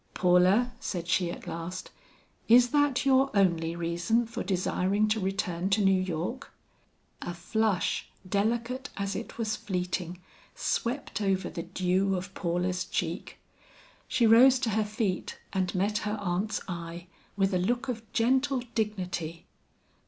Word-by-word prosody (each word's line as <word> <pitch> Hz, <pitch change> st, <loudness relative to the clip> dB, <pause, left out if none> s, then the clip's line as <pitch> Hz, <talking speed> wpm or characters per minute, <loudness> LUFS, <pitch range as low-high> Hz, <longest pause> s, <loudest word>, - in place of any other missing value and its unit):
"Paula," 185 Hz, +7 st, +4 dB
said 175 Hz, -3 st, -4 dB
she 175 Hz, 0 st, +2 dB
at -, -, -7 dB
last, 170 Hz, +3 st, -6 dB, 0.6 s
"is 245 Hz, +2 st, +7 dB
that 290 Hz, -1 st, +2 dB
your 270 Hz, 0 st, +4 dB
only 170 Hz, -4 st, +2 dB
reason 175 Hz, +8 st, 0 dB
for 230 Hz, +1 st, -5 dB
desiring 190 Hz, +2 st, +1 dB
to 215 Hz, +1 st, +1 dB
return 190 Hz, -2 st, -1 dB
to 200 Hz, 0 st, +3 dB
New 190 Hz, -1 st, +4 dB
York?" 185 Hz, -, -4 dB, 0.7 s
A 175 Hz, -, -5 dB
flush, 215 Hz, +1 st, 0 dB, 0.2 s
delicate 235 Hz, +7 st, -1 dB
as 200 Hz, -1 st, -2 dB
it -, -, -6 dB
was 220 Hz, -2 st, -1 dB
fleeting, 180 Hz, -2 st, -3 dB, 0.4 s
swept 245 Hz, -1 st, -2 dB
over 195 Hz, -2 st, 0 dB
the 170 Hz, -, -4 dB
dew 185 Hz, +2 st, 0 dB
of 185 Hz, +1 st, -5 dB
Paula's 180 Hz, 0 st, -1 dB
cheek. -, -, -3 dB, 0.7 s
She 235 Hz, -, +2 dB
rose 250 Hz, +4 st, +7 dB
to 235 Hz, -4 st, 0 dB
her 215 Hz, +1 st, +1 dB
feet 210 Hz, -3 st, -2 dB, 0.2 s
and 190 Hz, -1 st, 0 dB
met 205 Hz, +3 st, +1 dB
her 210 Hz, +1 st, -2 dB
aunt's 200 Hz, +2 st, -1 dB
eye, 170 Hz, -1 st, -6 dB, 0.3 s
with 195 Hz, 0 st, +2 dB
a 180 Hz, -, +2 dB
look 240 Hz, +8 st, 0 dB
of 240 Hz, -3 st, -3 dB
gentle 260 Hz, +3 st, +2 dB
dignity. 180 Hz, -6 st, -3 dB
195 Hz, 140 wpm, -29 LUFS, 180-230 Hz, 0.7 s, is